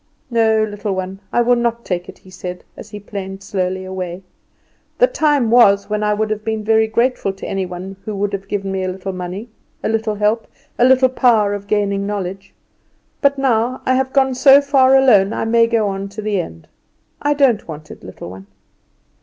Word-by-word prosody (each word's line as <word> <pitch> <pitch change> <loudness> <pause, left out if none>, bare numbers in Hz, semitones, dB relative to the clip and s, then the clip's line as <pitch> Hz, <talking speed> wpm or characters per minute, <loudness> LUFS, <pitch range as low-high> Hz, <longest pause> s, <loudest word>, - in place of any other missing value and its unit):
"No, 220 -2 +3
little 205 -1 -3
one, 190 +1 -5
I 240 - +2
will 245 +1 +4
not 235 0 -1
take 180 -1 -3
it," - - -11
he 185 - -18
said, 180 -1 -7
as - - -11
he 210 - -8
planed 195 -1 -7
slowly 185 -1 -2
away; 185 -1 -6 0.7
"the - - +6
time 295 - +1
was 205 -4 +5
when 210 0 0
I 210 0 +1
would 215 +1 -1
have 215 0 -3
been 220 -1 -2
very 220 +1 +3
grateful 235 -2 0
to 195 - -9
any 190 -1 -2
one 185 +2 -8
who 215 - -5
would 200 +1 -2
have 195 0 -5
given 195 -1 -3
me 190 -1 -2
a - - -1
little 190 +1 -5
money, 185 +5 -6 0.3
a - - 0
little 220 -1 -1
help, 210 +2 0 0.3
a 240 - +5
little 260 0 +5
power 230 -5 +2
of 200 0 -6
gaining 200 -1 0
knowledge. 195 -1 -5 0.7
But 280 0 +3
now, 250 -2 0
I 255 - +2
have 260 0 0
gone 265 -1 +2
so 270 +2 +7
far 270 -2 +4
alone 220 -6 +4
I - - -2
may 230 0 +4
go 230 -2 +1
on 195 0 -4
to - - -3
the 205 -3 0
end. 80 - -11 0.5
I 290 0 +1
don't 265 -7 +2
want 155 -1 -9
it, - - -12
little 90 -1 -9
one." 95 +1 -12
210 Hz, 205 wpm, -18 LUFS, 195-235 Hz, 0.7 s, so